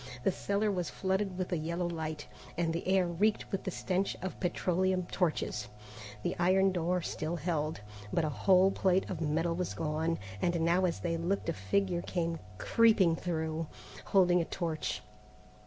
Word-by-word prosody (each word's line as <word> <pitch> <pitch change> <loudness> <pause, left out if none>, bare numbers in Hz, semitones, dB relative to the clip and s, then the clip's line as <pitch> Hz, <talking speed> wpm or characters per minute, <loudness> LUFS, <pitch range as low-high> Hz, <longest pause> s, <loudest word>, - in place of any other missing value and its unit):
The - - +3
cellar 200 +3 0
was 180 -4 -2
flooded 190 0 -1
with 185 0 -3
a 175 - +1
yellow 170 +3 -2
light, 160 -3 -4 0.3
and 165 -1 +1
the 170 - -3
air 190 -1 +4
reeked 195 +5 0
with 195 - -2
the - - 0
stench 185 +1 -1
of 190 - -4
petroleum 185 0 +1
torches. 155 - 0 0.6
The - - -1
iron 190 +2 +4
door 180 0 0
still 160 +2 -3
held, 160 - -2 0.3
but 165 - +1
a - - 0
whole 190 +5 +4
plate 190 -1 +2
of 170 -3 -4
metal 165 +2 +1
was 180 +1 -3
gone, 160 +1 -1 0.2
and 175 -1 +1
now 175 +3 +3
as 175 - -1
they 165 -1 -1
looked 175 +4 -1
a - - +1
figure 175 - 0
came 170 -2 -2 0.2
creeping 205 - +4
through, 160 -2 -2 0.4
holding 180 -2 +4
a - - -1
torch. 165 -4 -3
175 Hz, 170 wpm, -32 LUFS, 165-190 Hz, 0.6 s, air